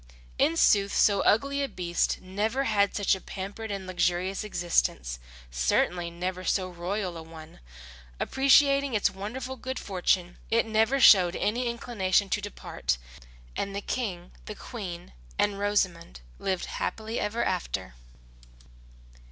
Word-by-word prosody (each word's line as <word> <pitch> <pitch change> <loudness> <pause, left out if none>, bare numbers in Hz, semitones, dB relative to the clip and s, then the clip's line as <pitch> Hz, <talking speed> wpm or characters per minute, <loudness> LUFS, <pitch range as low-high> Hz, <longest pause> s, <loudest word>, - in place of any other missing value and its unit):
In 165 - +3
sooth 200 +2 +4
so 200 -1 +4
ugly 275 +6 +2
a 280 - 0
beast 175 -4 -1
never 210 +8 -1
had 200 -5 +2
such 205 - +2
a 190 - -3
pampered 200 +3 -6
and 195 -2 -4
luxurious 185 +2 0
existence, 170 - 0 0.3
certainly 170 - +1
never 180 +2 -4
so 185 0 0
royal 180 +1 -3
a - - -7
one. 160 -1 -12 0.6
Appreciating 275 -1 +4
its 205 -1 +2
wonderful 240 +7 -5
good 260 +2 -5
fortune, 180 -3 0
it 230 +1 +3
never 225 +5 +2
showed 185 -8 +7
any 240 +4 0
inclination 205 -5 0
to 210 - 0
depart; 205 - -3 0.6
and 195 0 -3
the - - -1
King, 190 -8 -4
the 215 - -7
Queen, 185 -9 -7 0.2
and 205 -1 +1
Rosamund 185 - -1 0.2
lived 185 -2 -1
happily 220 +1 -3
ever 215 +3 -1
after. - - -2
200 Hz, 135 wpm, -28 LUFS, 180-225 Hz, 0.6 s, showed